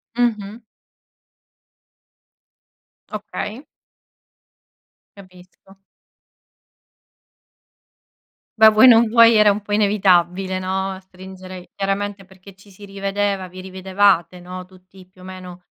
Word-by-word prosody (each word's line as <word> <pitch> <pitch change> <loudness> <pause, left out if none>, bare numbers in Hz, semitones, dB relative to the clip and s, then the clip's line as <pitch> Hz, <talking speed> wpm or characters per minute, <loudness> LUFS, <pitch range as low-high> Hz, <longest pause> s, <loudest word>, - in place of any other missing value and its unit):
Mh-mh. 225 -2 -2 2.5
Okay. 215 +4 -7 1.5
Capisco. 185 0 -18 2.8
Beh, 220 0 +8
vuoi 215 +4 +5
non 235 -1 +6
vuoi 230 +1 +5
era 210 -1 +5
un 205 +1 -1
po' 205 - -11
inevitabile, 190 -2 +1
no, 190 0 -4
stringere 185 -1 -13
chiaramente 200 0 -4
perché 190 +1 -17
ci 195 +2 -21
si 200 +1 -14
rivedeva 195 -1 -3
vi 185 +1 -11
rivedevate 190 -1 0
no, 180 +1 -9
tutti 185 0 -19
più 185 0 -22
o - - -14
meno 185 -1 -11
195 Hz, 95 wpm, -19 LUFS, 185-205 Hz, 2.8 s, Beh